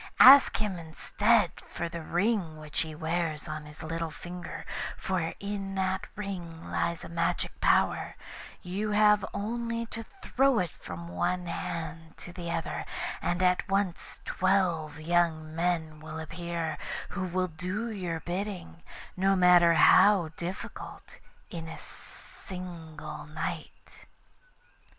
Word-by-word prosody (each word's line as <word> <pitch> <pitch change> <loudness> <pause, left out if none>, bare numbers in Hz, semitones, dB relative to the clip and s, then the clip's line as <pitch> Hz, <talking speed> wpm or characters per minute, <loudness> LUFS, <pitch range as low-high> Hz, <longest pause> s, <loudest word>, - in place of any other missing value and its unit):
Ask 270 +1 +10
him, 205 -5 -2
instead, 205 +5 +2 0.2
for 170 - -3
the 170 0 -6
ring 175 -1 0
which 155 -1 -4
he 160 -1 -2
wears 160 -1 -2
on 155 -1 -5
his 150 +2 -10
little 165 +1 -2
finger, 175 +3 -7 0.3
for 175 -3 -1
in 200 -1 -4
that 190 0 0
ring 175 -5 -6
lies 170 -1 -1
a - - -6
magic 170 0 0
power; - - +3 0.5
you 195 +4 -2
have 210 -1 +5
only 230 +2 -2
to 230 - -4 0.2
throw 270 -1 +3
it 180 -4 0
from 85 -1 -8
one 90 - -1
hand 165 -1 -5
to 175 - -10
the 175 -2 -5
other, 165 -1 -2 0.4
and 175 +1 0
at 180 +1 +2
once 195 -3 -1
twelve 175 -5 +1
young 160 -1 +1
men 165 -2 0
will 155 +1 -7
appear, 165 -1 -4 0.3
who 195 - -3
will 185 0 0
do 185 +8 -3
your 175 -6 -3
bidding, 180 -1 -4 0.3
no 195 +1 +3
matter 175 -2 +7
how 185 0 +6
difficult, 170 +3 -7 0.3
in 165 -1 -5
a 160 - -7
single 160 -5 -9
night. 155 +1 -6
175 Hz, 130 wpm, -29 LUFS, 160-195 Hz, 0.5 s, Ask